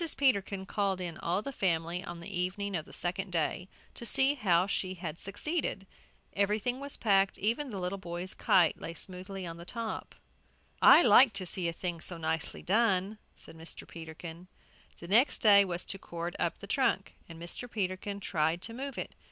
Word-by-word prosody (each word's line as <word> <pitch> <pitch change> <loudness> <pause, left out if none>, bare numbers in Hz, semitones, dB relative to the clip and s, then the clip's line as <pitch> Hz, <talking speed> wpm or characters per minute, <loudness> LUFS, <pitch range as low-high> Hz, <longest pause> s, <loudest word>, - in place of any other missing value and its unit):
Peterkin 200 -7 +1
called 195 -2 -1
in 175 -3 -4
all 180 +5 -1
the 275 - -4
family 175 -5 -1
on 170 0 -7
the 185 +3 -6
evening 195 +2 -2
of 155 -3 -3
the - - -14
second 185 +2 -1
day 175 +2 -1 0.2
to - - -8
see 265 +4 +5
how 185 -9 +2
she 190 -1 -2
had 170 -3 -6
succeeded. 210 - -2 0.5
Everything 210 +5 0
was 280 0 -2
packed, 195 -3 +3
even 235 +8 -1
the 200 -5 -5
little 180 +2 -3
boys' 175 0 -5
kite 175 -4 +3
lay 165 - -5
smoothly 185 +2 -6
on 165 -1 -6
the 170 - -9
top. 225 +4 -5 0.7
"I 345 - +9
like 235 +2 +7
to 195 -1 -2
see 175 0 0
a - - 0
thing 170 0 -4
so 175 - +1
nicely 160 -1 -3
done," 205 0 +2 0.2
said - - -10
Mr. 165 +1 -7
Peterkin. 165 +1 -9 0.5
The 170 - -9
next 235 +9 +3
thing 200 -2 +7
was 175 0 0
to 195 - -2
cord 170 0 -5
up - - 0
the - - -9
trunk, - - 0 0.2
and 165 -1 -10
Mr. 175 +8 -6
Peterkin 200 -1 -3
tried 165 -3 0
to 230 - -3
move 270 +1 -6
it. - - -5
190 Hz, 185 wpm, -31 LUFS, 170-210 Hz, 0.7 s, I